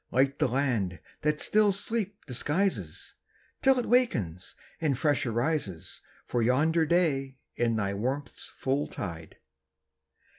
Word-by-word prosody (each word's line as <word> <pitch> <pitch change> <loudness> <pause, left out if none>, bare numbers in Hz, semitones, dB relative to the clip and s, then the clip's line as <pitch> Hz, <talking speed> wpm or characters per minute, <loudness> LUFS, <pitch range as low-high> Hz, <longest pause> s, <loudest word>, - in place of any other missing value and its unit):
Light 135 +2 +2
the - - +3
land 120 - 0 0.2
that 150 0 +1
still 210 -1 +3
sleep 205 0 -3
disguises 135 - -1 0.5
Till 265 -1 +5
it 245 - 0
awakens 110 - +1 0.3
and 145 -5 +1
fresh 145 -3 +1
arises 120 - -2 0.2
For 120 - 0
yonder 155 +7 +3
day 140 -6 +1 0.2
in 115 -1 +1
thy 100 -2 0
warmth's 130 +8 -4
full 135 +2 0
tide! 85 -4 -7
135 Hz, 120 wpm, -29 LUFS, 115-165 Hz, 0.5 s, Till